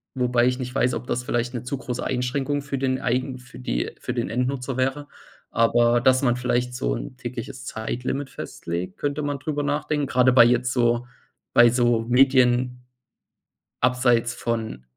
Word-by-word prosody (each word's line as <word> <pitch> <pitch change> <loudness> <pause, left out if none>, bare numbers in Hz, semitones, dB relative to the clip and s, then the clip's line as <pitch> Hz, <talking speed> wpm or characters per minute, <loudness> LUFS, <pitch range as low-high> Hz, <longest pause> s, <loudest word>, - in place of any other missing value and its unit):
wobei 125 -1 +2
ich 125 +1 0
nicht 125 0 -5
weiß, 125 -1 +2
ob 125 - -6
das 125 +1 -1
vielleicht 120 +1 -1
'ne 120 - -4
zu 125 +3 -3
große 125 -2 -4
Einschränkung 135 +3 -1
für 140 -1 -3
den 130 -1 0
eigen 130 +1 -1
für 125 - -14
die - - -2
für - - -4
den - - -2
Endnutzer 125 +1 -2
wäre, 135 +3 -1 0.4
aber 120 +1 +3
dass 130 +1 +4
man 120 -2 +3
vielleicht 125 0 -1
so - - -1
'n 125 - -7
tägliches 125 0 -7
Zeitlimit 125 +5 -3
festlegt, 85 +2 -6
könnte 145 +1 -2
man 145 -1 -2
darüber 145 +1 -2
nachdenken. 145 0 -1
Gerade 130 -1 +3
bei 120 -2 +8
jetzt 125 +1 +2
so 120 -1 +1 0.5
bei 120 0 +7
so 120 -1 +2
Medien 125 -1 +3 1.0
abseits 120 -2 +2
von 110 - -3
125 Hz, 170 wpm, -24 LUFS, 120-130 Hz, 1.0 s, bei